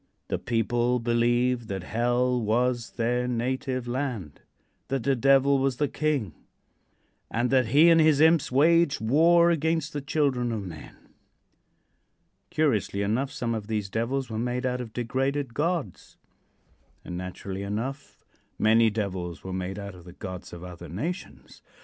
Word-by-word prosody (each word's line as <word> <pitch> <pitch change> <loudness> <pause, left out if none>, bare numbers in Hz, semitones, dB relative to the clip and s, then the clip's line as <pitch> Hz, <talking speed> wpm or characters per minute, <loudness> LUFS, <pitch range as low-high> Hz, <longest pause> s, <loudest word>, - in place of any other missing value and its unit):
The - - -1
people 120 +1 0
believed 120 0 +1
that 95 -4 -4
hell 120 +4 +1
was 120 +2 0
their 125 +1 0
native 125 +1 -2
land; 120 - -4 0.5
that 135 -2 -2
the 135 +2 +2
Devil 135 +2 +4
was 135 -2 0
a 145 - +2
king, 140 - -1 1.0
and 120 +2 0
that 130 -2 +4
lie 150 - +7
and 165 0 +7
his 155 -2 +4
imps 160 -2 +4
waged 160 +3 +4
war 170 +9 +4
against 160 -1 0
the 145 - -3
children 135 -4 0
of 105 -3 -3
men. 80 -5 -10 1.5
Curiously 110 -9 0
enough 120 +7 0
some 125 -5 -2
of 110 -2 -4
these 105 -3 -3
devils 125 +4 -1
were 110 -1 -4
made 125 +2 -2
out 125 0 -1
of 115 -3 -7
degraded 130 +3 -2
gods, 150 - -3 0.9
and, 90 - -6
naturally 90 +2 -6
enough, 115 +8 -5 0.3
many 110 +1 +4
devils 95 -5 -4
were 95 - -5
made 95 +1 -4
out 100 -1 -6
of 90 -2 -14
the 90 - -11
gods 95 -1 -8
of 85 0 -9
other 90 -2 -9
nations. 160 - -6
120 Hz, 150 wpm, -26 LUFS, 105-140 Hz, 1.5 s, lie